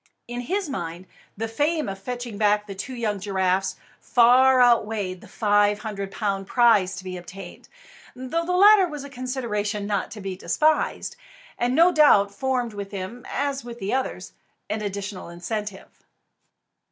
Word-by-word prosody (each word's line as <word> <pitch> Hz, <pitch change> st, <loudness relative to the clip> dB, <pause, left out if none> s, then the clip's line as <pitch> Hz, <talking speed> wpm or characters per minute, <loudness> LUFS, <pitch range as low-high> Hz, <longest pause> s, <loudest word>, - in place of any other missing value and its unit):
In 240 Hz, +1 st, -4 dB
his 375 Hz, +8 st, -2 dB
mind, 175 Hz, -, -5 dB, 0.3 s
the 225 Hz, +2 st, -2 dB
fame 295 Hz, +7 st, 0 dB
of 195 Hz, -1 st, -5 dB
fetching 240 Hz, 0 st, -6 dB
back 210 Hz, 0 st, +3 dB
the 200 Hz, -, -7 dB
two 225 Hz, +7 st, -6 dB
young 215 Hz, -4 st, -2 dB
giraffes 190 Hz, -1 st, 0 dB, 0.2 s
far 255 Hz, +2 st, +5 dB
outweighed 215 Hz, -6 st, +2 dB
the -, -, -13 dB
five 205 Hz, -1 st, +2 dB
hundred 200 Hz, -3 st, -5 dB
pound 195 Hz, -3 st, -2 dB
prize 215 Hz, -6 st, +4 dB
to 185 Hz, -, -8 dB
be 185 Hz, -1 st, -6 dB
obtained, 180 Hz, +1 st, -11 dB, 0.5 s
though 260 Hz, +7 st, -2 dB
the 350 Hz, -, -3 dB
latter 405 Hz, -1 st, +7 dB
was 295 Hz, -4 st, -7 dB
a 280 Hz, -, -10 dB
consideration 230 Hz, -6 st, -3 dB
not 200 Hz, -2 st, -1 dB
to 215 Hz, -, -9 dB
be 195 Hz, -2 st, -5 dB
despised, 310 Hz, -, 0 dB, 0.4 s
and 245 Hz, +1 st, 0 dB
no 340 Hz, +4 st, +6 dB
doubt 205 Hz, -, +5 dB
formed 250 Hz, -2 st, -1 dB
with 200 Hz, -1 st, -6 dB
him, 200 Hz, +5 st, -7 dB
as 275 Hz, 0 st, -2 dB
with 235 Hz, -1 st, -8 dB
the 200 Hz, -2 st, -3 dB
others, 265 Hz, 0 st, -3 dB, 0.4 s
an 215 Hz, -, -2 dB
additional 200 Hz, -2 st, -5 dB
incentive. 195 Hz, +3 st, -6 dB
215 Hz, 160 wpm, -24 LUFS, 195-255 Hz, 0.5 s, latter